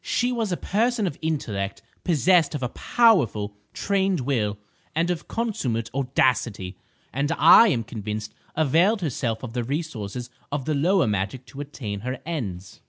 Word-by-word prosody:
She 245 Hz, 0 st, +1 dB
was 225 Hz, -5 st, -1 dB
a 175 Hz, -, 0 dB
person 225 Hz, +2 st, +1 dB
of 175 Hz, -, -3 dB
intellect, 110 Hz, -12 st, -2 dB, 0.2 s
possessed 170 Hz, -1 st, +3 dB
of 135 Hz, -, -3 dB
a 125 Hz, -, -1 dB
powerful, 130 Hz, -, +2 dB, 0.2 s
trained 195 Hz, -4 st, 0 dB
will, 110 Hz, -6 st, 0 dB, 0.4 s
and 170 Hz, +2 st, +2 dB
of 175 Hz, -, -4 dB
consummate 125 Hz, -, -2 dB
audacity, 125 Hz, -7 st, 0 dB, 0.4 s
and 140 Hz, +4 st, 0 dB
I 230 Hz, -, +8 dB
am 125 Hz, -, +1 dB
convinced 105 Hz, -2 st, -5 dB, 0.2 s
availed 165 Hz, -, +3 dB
herself 125 Hz, -7 st, -2 dB
of 115 Hz, -3 st, -6 dB
the 120 Hz, -1 st, -1 dB
resources 125 Hz, -, -4 dB, 0.2 s
of 140 Hz, -2 st, -2 dB
the 155 Hz, -, 0 dB
lower 175 Hz, +6 st, +3 dB
magic 105 Hz, +5 st, -2 dB
to 140 Hz, -, -8 dB
attain 115 Hz, -8 st, -5 dB
her 125 Hz, +4 st, -4 dB
ends. 100 Hz, -, -5 dB
140 Hz, 155 wpm, -24 LUFS, 110-175 Hz, 0.4 s, I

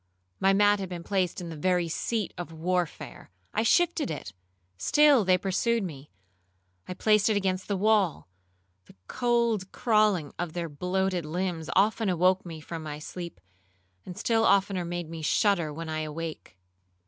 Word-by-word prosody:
My 195 Hz, -, +4 dB
mat 205 Hz, +1 st, +4 dB
had 190 Hz, -2 st, -4 dB
been 175 Hz, -2 st, -6 dB
placed 185 Hz, -2 st, -1 dB
in 170 Hz, -, -6 dB
the 165 Hz, -, -6 dB
very 180 Hz, +2 st, +1 dB
seat 215 Hz, +5 st, -2 dB
of 175 Hz, -2 st, -7 dB
warfare;—I 165 Hz, -, -4 dB
shifted 340 Hz, +6 st, +2 dB
it,—still 95 Hz, -, +1 dB
they 185 Hz, -1 st, +4 dB
pursued 210 Hz, +5 st, 0 dB
me;—I 90 Hz, -, -12 dB
placed 215 Hz, +2 st, +3 dB
it 215 Hz, -, +2 dB
against 190 Hz, -1 st, -1 dB
the 200 Hz, -, -1 dB
wall,—the 95 Hz, -, -2 dB
cold 235 Hz, -5 st, 0 dB
crawling 210 Hz, -, +2 dB
of 175 Hz, -2 st, -3 dB
their 170 Hz, -1 st, -3 dB
bloated 180 Hz, +4 st, -1 dB
limbs 165 Hz, 0 st, -3 dB
often 210 Hz, +2 st, +2 dB
awoke 185 Hz, +1 st, +2 dB
me 165 Hz, -2 st, -7 dB
from 165 Hz, +2 st, -7 dB
my 150 Hz, -1 st, -6 dB
sleep, 170 Hz, +3 st, -8 dB, 0.6 s
and 180 Hz, -, -9 dB
still 225 Hz, -1 st, +1 dB
oftener 195 Hz, -3 st, +2 dB
made 175 Hz, -1 st, -4 dB
me 165 Hz, 0 st, -7 dB
shudder 170 Hz, -1 st, +2 dB
when 165 Hz, +2 st, -6 dB
awake. 155 Hz, -, -5 dB
180 Hz, 145 wpm, -27 LUFS, 155-200 Hz, 0.6 s, My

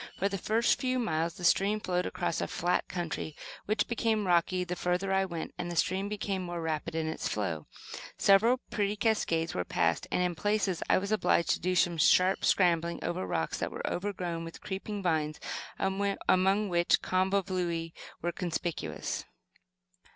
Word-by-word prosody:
For 195 Hz, -, +1 dB
the 195 Hz, -1 st, -3 dB
first 225 Hz, +5 st, +2 dB
few 255 Hz, -1 st, +1 dB
miles 165 Hz, -8 st, 0 dB
the 180 Hz, -, -10 dB
stream 200 Hz, +4 st, +3 dB
flowed 180 Hz, -3 st, -1 dB
across 175 Hz, -2 st, -2 dB
a -, -, -1 dB
flat 175 Hz, +1 st, 0 dB
country, 170 Hz, -3 st, -4 dB, 0.3 s
which 215 Hz, +2 st, +1 dB
became 225 Hz, -3 st, 0 dB
rocky 180 Hz, +1 st, +2 dB
the 180 Hz, 0 st, -4 dB
further 180 Hz, +2 st, 0 dB
I 190 Hz, 0 st, +3 dB
went, 170 Hz, -3 st, -5 dB
and 175 Hz, -, -3 dB
the 175 Hz, -, -4 dB
stream 185 Hz, +4 st, +1 dB
became 200 Hz, -2 st, -2 dB
more 175 Hz, -1 st, -4 dB
rapid 160 Hz, 0 st, -3 dB
in 160 Hz, -1 st, 0 dB
its 160 Hz, 0 st, -2 dB
flow. 85 Hz, -8 st, -2 dB, 0.5 s
Several 220 Hz, +6 st, +5 dB
pretty 205 Hz, -1 st, 0 dB
cascades 200 Hz, -7 st, +1 dB
were 90 Hz, -, -1 dB
passed 85 Hz, -1 st, 0 dB
and, 180 Hz, -, +2 dB
in 180 Hz, -1 st, 0 dB
places, 195 Hz, +1 st, 0 dB
I -, -, +5 dB
was 200 Hz, +2 st, -2 dB
obliged 210 Hz, -5 st, +2 dB
to -, -, +1 dB
do 185 Hz, +1 st, 0 dB
some 175 Hz, -1 st, +2 dB
sharp 185 Hz, +5 st, +4 dB
scrambling 170 Hz, -2 st, +3 dB
over 170 Hz, -, -2 dB
rocks 80 Hz, -2 st, -1 dB
that -, -, -1 dB
were -, -, -6 dB
overgrown 180 Hz, -3 st, -3 dB
with 165 Hz, 0 st, -8 dB
creeping 200 Hz, +1 st, -5 dB
vines, 155 Hz, -3 st, 0 dB, 0.4 s
among 195 Hz, 0 st, +1 dB
which 175 Hz, -1 st, +3 dB
convolvuli 185 Hz, -3 st, 0 dB, 0.3 s
were 175 Hz, -, 0 dB
conspicuous. 175 Hz, -1 st, -3 dB
180 Hz, 170 wpm, -30 LUFS, 170-200 Hz, 0.5 s, Several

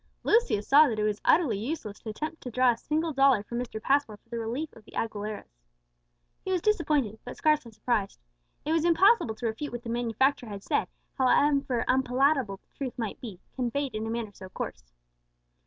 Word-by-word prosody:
Lucius 435 Hz, -, +2 dB
saw 295 Hz, +3 st, +7 dB
that 225 Hz, -, -2 dB
it 210 Hz, -, 0 dB
was 210 Hz, 0 st, -1 dB
utterly 255 Hz, -, +3 dB
useless 220 Hz, -4 st, -5 dB
to 225 Hz, -, -8 dB
attempt 310 Hz, +9 st, -5 dB
to 250 Hz, -, -6 dB
draw 250 Hz, +1 st, +4 dB
a -, -, -2 dB
single 315 Hz, +5 st, -1 dB
dollar 270 Hz, -6 st, +4 dB
from 235 Hz, +3 st, -4 dB
Mr. 245 Hz, -3 st, -5 dB
Passmore 270 Hz, -2 st, +1 dB
for 230 Hz, -, -38 dB
the 235 Hz, -1 st, -4 dB
relief 245 Hz, +8 st, -3 dB
of 225 Hz, -, -15 dB
the -, -, -16 dB
Aguileras. 210 Hz, -, -4 dB, 0.8 s
He 380 Hz, -, -3 dB
was 370 Hz, -, +2 dB
disappointed, 300 Hz, -, +1 dB
but 245 Hz, -, -8 dB
scarcely 300 Hz, -6 st, +2 dB
surprised. 215 Hz, -2 st, -1 dB, 0.5 s
It 305 Hz, -, -1 dB
was 325 Hz, -1 st, +2 dB
impossible 345 Hz, -, +4 dB
to 240 Hz, -, -6 dB
refute 230 Hz, +6 st, -3 dB
what 240 Hz, 0 st, -6 dB
the 235 Hz, -, -6 dB
manufacturer 240 Hz, +2 st, 0 dB
had 200 Hz, -1 st, -7 dB
said, -, -, 0 dB, 0.3 s
however 270 Hz, -1 st, +3 dB
unpalatable 260 Hz, -4 st, +2 dB
truth 265 Hz, -3 st, -5 dB
might 225 Hz, -4 st, -4 dB
be, 210 Hz, -8 st, -8 dB, 0.2 s
conveyed 260 Hz, +1 st, -2 dB
in 215 Hz, +1 st, -3 dB
a -, -, -3 dB
manner 230 Hz, -2 st, -3 dB
so 185 Hz, 0 st, -11 dB
coarse. -, -, -7 dB
245 Hz, 190 wpm, -28 LUFS, 220-285 Hz, 0.8 s, saw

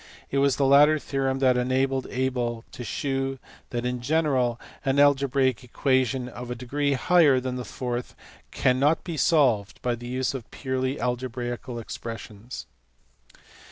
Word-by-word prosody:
It 140 Hz, -, +1 dB
was 140 Hz, -1 st, +3 dB
the 140 Hz, -, +1 dB
latter 145 Hz, +3 st, +6 dB
theorem 135 Hz, -2 st, -1 dB
that 125 Hz, -1 st, +4 dB
enabled 130 Hz, +1 st, 0 dB
Abel 125 Hz, -3 st, -2 dB
to 125 Hz, -, -7 dB
shew 135 Hz, +3 st, -2 dB, 0.3 s
that 120 Hz, 0 st, -3 dB
in 125 Hz, 0 st, -2 dB
general 130 Hz, -4 st, +1 dB, 0.2 s
an 135 Hz, 0 st, +1 dB
algebraic 135 Hz, -4 st, +3 dB
equation 130 Hz, 0 st, 0 dB
of 125 Hz, 0 st, -8 dB
a 125 Hz, -, -3 dB
degree 140 Hz, +4 st, -1 dB
higher 145 Hz, -1 st, +4 dB
than 125 Hz, 0 st, -3 dB
the 125 Hz, -, -4 dB
fourth 125 Hz, 0 st, -4 dB, 0.3 s
cannot 135 Hz, +4 st, +2 dB
be 170 Hz, -, -5 dB
solved 130 Hz, -, +2 dB
by 125 Hz, -, +1 dB
the 120 Hz, +1 st, -7 dB
use 130 Hz, +2 st, -1 dB
of 130 Hz, -4 st, -7 dB
purely 130 Hz, 0 st, -2 dB
algebraical 125 Hz, 0 st, -3 dB
expressions. 115 Hz, 0 st, -7 dB
130 Hz, 145 wpm, -26 LUFS, 125-135 Hz, 0.3 s, latter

